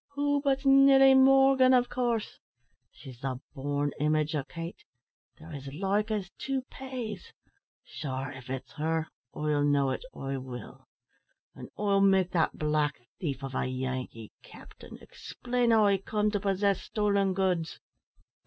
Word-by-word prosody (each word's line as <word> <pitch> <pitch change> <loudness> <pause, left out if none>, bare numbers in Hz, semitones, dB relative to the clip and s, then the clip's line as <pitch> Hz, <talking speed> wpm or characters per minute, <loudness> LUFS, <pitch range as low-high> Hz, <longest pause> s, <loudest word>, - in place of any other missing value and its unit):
"Who 285 0 +1
but 275 -1 0
Nelly 270 0 +7
Morgan, 265 -1 +6
av 245 0 +3
course. 240 -3 -2 0.5
She's 130 -4 -13
the 130 -1 -4
born 145 +1 -2
image 155 +1 +1
o' 150 -3 -1
Kate. 165 +4 -8 0.5
They're 160 +1 -12
as 140 -1 -7
like 200 +7 -1
as 200 -4 -3
two 270 -1 -2
paise. 260 - -7 0.5
Sure 135 -1 -5
av 130 -1 -12
it's 130 0 -5
her, 160 +1 -1 0.3
I'll 150 -1 0
know 140 -2 +2
it, 130 - -3
I 135 0 -4
will; 130 -1 -9 0.7
an' - - -10
I'll 200 -1 +2
make 190 -2 +3
that 165 -3 0
black 150 -2 0 0.2
thief 140 -5 -4
of 135 -1 -5
a - - -1
Yankee 130 -3 -5
explain 245 -1 -5
how 220 -2 +5
he 200 -1 +3
comed 210 +2 -1
to 205 - +1
possess 195 0 0
stolen 200 -3 0
goods." 180 -4 -1
185 Hz, 145 wpm, -29 LUFS, 145-230 Hz, 0.7 s, Nelly